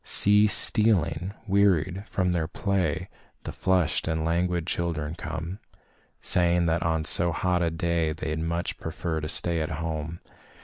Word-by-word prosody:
See 105 Hz, +1 st, +6 dB
stealing, 100 Hz, -5 st, +3 dB
wearied 95 Hz, -2 st, +1 dB
from 90 Hz, -2 st, -1 dB
their 85 Hz, -3 st, -1 dB
play, 95 Hz, -4 st, -2 dB, 0.4 s
The -, -, -6 dB
flushed 90 Hz, -4 st, 0 dB
and 80 Hz, -1 st, -1 dB
languid 85 Hz, 0 st, 0 dB
children 80 Hz, -3 st, -2 dB
come, 85 Hz, +2 st, -6 dB, 0.6 s
Saying 85 Hz, -1 st, +2 dB
that 80 Hz, 0 st, 0 dB
on 80 Hz, -1 st, 0 dB
so 85 Hz, +2 st, +2 dB
hot 90 Hz, +1 st, 0 dB
a 85 Hz, -, +1 dB
day 80 Hz, -1 st, -1 dB
They'd 80 Hz, 0 st, -4 dB
much 85 Hz, +2 st, -3 dB
prefer 80 Hz, -1 st, -4 dB
to 75 Hz, -, -5 dB
stay 85 Hz, 0 st, 0 dB
at 80 Hz, -, -2 dB
home. 80 Hz, +1 st, -4 dB
85 Hz, 145 wpm, -26 LUFS, 80-90 Hz, 0.6 s, See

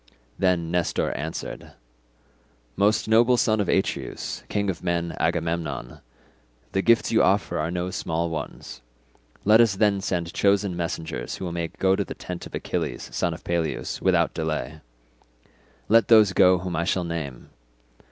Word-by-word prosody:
Then 90 Hz, -3 st, +1 dB
Nestor 90 Hz, -1 st, 0 dB
answered, 80 Hz, +2 st, -6 dB, 1.0 s
"Most 105 Hz, +2 st, +2 dB
noble 120 Hz, +3 st, +5 dB
son 110 Hz, -2 st, +2 dB
of 100 Hz, -, -2 dB
Atreus, -, -, -2 dB
king 100 Hz, -1 st, -1 dB
of 90 Hz, -, -10 dB
men, 85 Hz, -1 st, -1 dB
Agamemnon. 80 Hz, -6 st, -2 dB, 0.7 s
The 95 Hz, -, +1 dB
gifts 115 Hz, +2 st, +3 dB
you -, -, +4 dB
offer -, -, +2 dB
are 75 Hz, +2 st, -1 dB
no 90 Hz, +1 st, -3 dB
small 85 Hz, -2 st, -2 dB
ones, 75 Hz, -4 st, -6 dB, 0.6 s
let 110 Hz, +3 st, +7 dB
us 115 Hz, -5 st, +3 dB
then 100 Hz, -1 st, +2 dB
send 85 Hz, -3 st, -2 dB
chosen 100 Hz, -2 st, +2 dB
messengers, 80 Hz, -2 st, -4 dB
who 90 Hz, -2 st, -5 dB
may 85 Hz, -1 st, -2 dB
go 95 Hz, +3 st, +1 dB
to -, -, 0 dB
the -, -, -8 dB
tent 90 Hz, -1 st, -7 dB
of -, -, -8 dB
Achilles -, -, -3 dB
son -, -, 0 dB
of -, -, -13 dB
Peleus 85 Hz, -2 st, -2 dB
without 90 Hz, -3 st, +2 dB
delay. 80 Hz, -2 st, -3 dB, 1.1 s
Let 115 Hz, +1 st, +5 dB
those 110 Hz, -4 st, +6 dB
go 90 Hz, 0 st, +5 dB
whom 90 Hz, 0 st, -4 dB
I 85 Hz, -, 0 dB
shall 95 Hz, 0 st, 0 dB
name. 80 Hz, -7 st, -6 dB
90 Hz, 150 wpm, -25 LUFS, 85-100 Hz, 1.1 s, let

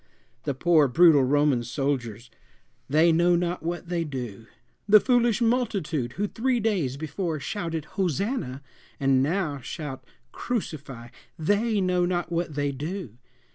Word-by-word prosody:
The 140 Hz, -3 st, -1 dB
poor 160 Hz, 0 st, +4 dB
brutal 155 Hz, 0 st, +6 dB
Roman 140 Hz, -2 st, +2 dB
soldiers 120 Hz, -3 st, -3 dB, 0.6 s
they 160 Hz, +4 st, +4 dB
know 175 Hz, +2 st, +4 dB
not 175 Hz, +1 st, -1 dB
what 175 Hz, +1 st, -4 dB
they 170 Hz, -1 st, -1 dB
do! 120 Hz, -7 st, -6 dB, 0.4 s
The 215 Hz, +1 st, +9 dB
foolish 240 Hz, -1 st, +2 dB
multitude 200 Hz, -, 0 dB
who 205 Hz, -, -1 dB
three 245 Hz, +4 st, 0 dB
days 185 Hz, -, 0 dB
before 155 Hz, +2 st, -3 dB
shouted 165 Hz, -2 st, -4 dB
"Hosanna," 185 Hz, -, -2 dB, 0.4 s
and 135 Hz, -2 st, +3 dB
now 155 Hz, -1 st, -1 dB
shout 135 Hz, 0 st, -7 dB, 0.3 s
"Crucify" 140 Hz, -, -5 dB, 0.3 s
they 205 Hz, +6 st, +1 dB
know 180 Hz, -1 st, +1 dB
not 175 Hz, -1 st, -2 dB
what 170 Hz, -3 st, -2 dB
they 145 Hz, -1 st, 0 dB
do! 145 Hz, -, -6 dB
160 Hz, 135 wpm, -26 LUFS, 135-185 Hz, 0.6 s, The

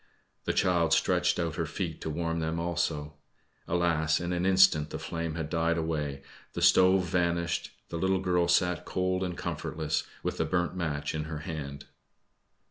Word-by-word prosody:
The -, -, 0 dB
child 85 Hz, -3 st, +2 dB
stretched 90 Hz, +1 st, +2 dB
out 85 Hz, -2 st, -2 dB
her 85 Hz, -2 st, -1 dB
feet 80 Hz, +1 st, -4 dB
to -, -, -3 dB
warm 85 Hz, +1 st, -2 dB
them 80 Hz, +1 st, -2 dB
also. 80 Hz, -3 st, -2 dB, 0.5 s
Alas! 80 Hz, -2 st, +2 dB
in 85 Hz, +1 st, -2 dB
an 90 Hz, +1 st, 0 dB
instant 95 Hz, -6 st, +5 dB
the -, -, -4 dB
flame 85 Hz, -1 st, -4 dB
had 80 Hz, -2 st, -3 dB
died 85 Hz, +1 st, +1 dB
away, 75 Hz, -4 st, -2 dB, 0.3 s
the -, -, -4 dB
stove 95 Hz, 0 st, +5 dB
vanished, 85 Hz, -2 st, 0 dB, 0.2 s
the 85 Hz, -, -4 dB
little 95 Hz, +2 st, +2 dB
girl 90 Hz, -2 st, +1 dB
sat 90 Hz, -1 st, +2 dB
cold 95 Hz, 0 st, -1 dB
and 90 Hz, -2 st, -3 dB
comfortless, 75 Hz, -1 st, -2 dB, 0.2 s
with -, -, -2 dB
the -, -, +2 dB
burnt 90 Hz, 0 st, 0 dB
match 75 Hz, -5 st, -2 dB
in 75 Hz, -1 st, -3 dB
her 75 Hz, -1 st, -5 dB
hand. 70 Hz, -3 st, -6 dB
85 Hz, 170 wpm, -29 LUFS, 80-90 Hz, 0.5 s, instant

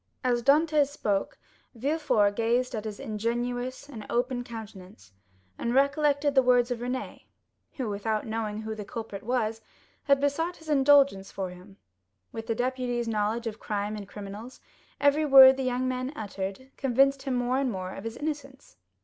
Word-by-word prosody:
As 245 Hz, -1 st, +1 dB
Dantès 295 Hz, +2 st, +4 dB
spoke, 210 Hz, -8 st, -2 dB, 0.4 s
Villefort 235 Hz, -6 st, +1 dB
gazed 240 Hz, +3 st, +1 dB
at 220 Hz, -1 st, -4 dB
his 210 Hz, -1 st, -6 dB
ingenuous 245 Hz, +5 st, -3 dB
and 235 Hz, -7 st, -9 dB
open 245 Hz, +1 st, -1 dB
countenance, 200 Hz, -, -11 dB, 0.5 s
and 235 Hz, +1 st, -1 dB
recollected 285 Hz, +1 st, +2 dB
the 265 Hz, -, +6 dB
words 250 Hz, -1 st, +3 dB
of 240 Hz, -, -2 dB
Renée, 250 Hz, +2 st, -5 dB, 0.5 s
who, 255 Hz, -4 st, -4 dB
without 210 Hz, +1 st, -2 dB
knowing 220 Hz, -1 st, -3 dB
who 220 Hz, 0 st, -4 dB
the 215 Hz, -1 st, -6 dB
culprit 215 Hz, -1 st, -7 dB
was, 225 Hz, -2 st, -1 dB, 0.4 s
had 280 Hz, -1 st, +4 dB
besought 325 Hz, +5 st, -1 dB
his 320 Hz, -1 st, -13 dB
indulgence 275 Hz, -8 st, +4 dB
for 190 Hz, -2 st, -4 dB
him. 185 Hz, +2 st, -14 dB, 0.5 s
With 225 Hz, 0 st, -7 dB
the 225 Hz, -, 0 dB
deputy's 245 Hz, -1 st, -1 dB
knowledge 220 Hz, +2 st, -1 dB
of 220 Hz, -1 st, -5 dB
crime 210 Hz, 0 st, -3 dB
and 205 Hz, -2 st, -7 dB
criminals, 205 Hz, +5 st, -9 dB, 0.4 s
every 285 Hz, +2 st, +3 dB
word 270 Hz, -2 st, +9 dB
the 265 Hz, -, -4 dB
young 255 Hz, 0 st, -1 dB
man 255 Hz, +1 st, -2 dB
uttered 200 Hz, +4 st, -6 dB
convinced 270 Hz, +1 st, +2 dB
him 270 Hz, -2 st, -2 dB
more 245 Hz, +2 st, 0 dB
and 275 Hz, -2 st, 0 dB
more 185 Hz, -2 st, -5 dB
of 195 Hz, -, -8 dB
his 225 Hz, +1 st, -6 dB
innocence. 290 Hz, -3 st, -6 dB
245 Hz, 165 wpm, -27 LUFS, 215-270 Hz, 0.5 s, word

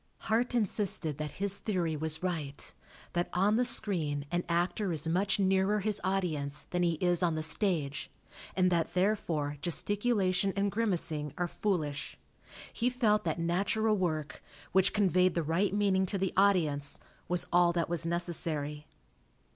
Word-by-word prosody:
Hart 235 Hz, +3 st, 0 dB
insisted 195 Hz, -, -1 dB
that 150 Hz, -2 st, -4 dB
his 200 Hz, 0 st, +1 dB
theory 175 Hz, -7 st, -1 dB
was 160 Hz, +2 st, -1 dB
right; 155 Hz, -6 st, -3 dB, 0.4 s
that 175 Hz, 0 st, -1 dB
on 200 Hz, +4 st, +2 dB
the 245 Hz, -, +3 dB
screen 170 Hz, -12 st, +1 dB
an 175 Hz, 0 st, 0 dB
actor 175 Hz, +3 st, 0 dB
is 160 Hz, -1 st, -2 dB
much 185 Hz, +5 st, +1 dB
nearer 195 Hz, +1 st, +2 dB
his 210 Hz, 0 st, 0 dB
audience 160 Hz, -7 st, -1 dB
than 180 Hz, -, 0 dB
he 170 Hz, -1 st, +2 dB
is 175 Hz, +1 st, +1 dB
on 170 Hz, -3 st, +1 dB
the 155 Hz, -, -1 dB
stage, 155 Hz, -3 st, -1 dB, 0.5 s
and 185 Hz, -1 st, +3 dB
that 170 Hz, -1 st, 0 dB
therefore 170 Hz, -7 st, 0 dB
gesticulation 195 Hz, +1 st, +2 dB
and 200 Hz, 0 st, 0 dB
grimacing 165 Hz, -9 st, 0 dB
are 175 Hz, -, 0 dB
foolish. 160 Hz, -7 st, -2 dB, 0.6 s
He 245 Hz, +1 st, +1 dB
felt 225 Hz, -6 st, +1 dB
that 160 Hz, -, -1 dB
natural 200 Hz, +6 st, +1 dB
work, 155 Hz, -6 st, -2 dB, 0.3 s
which 190 Hz, +1 st, +3 dB
conveyed 185 Hz, -3 st, +2 dB
the 170 Hz, -, 0 dB
right 170 Hz, +5 st, +1 dB
meaning 195 Hz, -2 st, +1 dB
to 200 Hz, -, -1 dB
the 190 Hz, -1 st, -1 dB
audience, 160 Hz, -8 st, +2 dB, 0.3 s
was 180 Hz, -1 st, +1 dB
all 175 Hz, 0 st, +5 dB
that 170 Hz, -1 st, 0 dB
was 170 Hz, -1 st, +1 dB
necessary. 160 Hz, -3 st, -1 dB
180 Hz, 155 wpm, -31 LUFS, 160-200 Hz, 0.6 s, all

